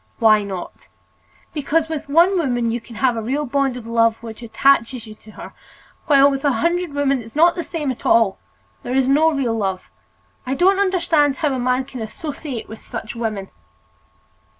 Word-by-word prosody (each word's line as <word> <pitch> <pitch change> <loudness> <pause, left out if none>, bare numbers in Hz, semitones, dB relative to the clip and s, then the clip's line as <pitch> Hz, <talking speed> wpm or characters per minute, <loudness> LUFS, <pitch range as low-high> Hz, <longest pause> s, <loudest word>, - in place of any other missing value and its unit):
"Why 215 -2 +5
not?" 190 -3 -8 0.7
"Because 310 +2 0
with 315 -3 -5
one 340 +6 +4
woman 245 -9 0
you 235 +1 -3
have 250 +1 +1
a 225 - -3
real 275 +7 -2
bond 270 -1 0
of 240 - -9
love 230 -1 +1
which 225 0 -9
attaches 240 0 +1
you 215 - -10
to 215 0 -17
her, - - -10 0.5
while 280 -1 +6
with 275 0 -3
a 285 -2 +2
hundred 340 -1 -1
women 275 -2 +1
it's 225 +2 -14
not 340 +3 +5
the 345 - -4
same 310 -5 -3
at 250 - -9
all. 225 -4 +3 0.4
There 250 - -4
is 265 -1 +2
no 305 +4 +4
real 270 -6 -1
love. 195 - -3 0.5
I 260 +2 -2
don't 385 +6 +3
understand 335 -7 +2
how 300 -4 0
a 260 - -2
man 250 +1 0
can 260 -3 -8
associate 275 +2 -6
with 220 - -10
such 230 - -7
women." 215 -4 -4
265 Hz, 185 wpm, -20 LUFS, 230-295 Hz, 0.7 s, while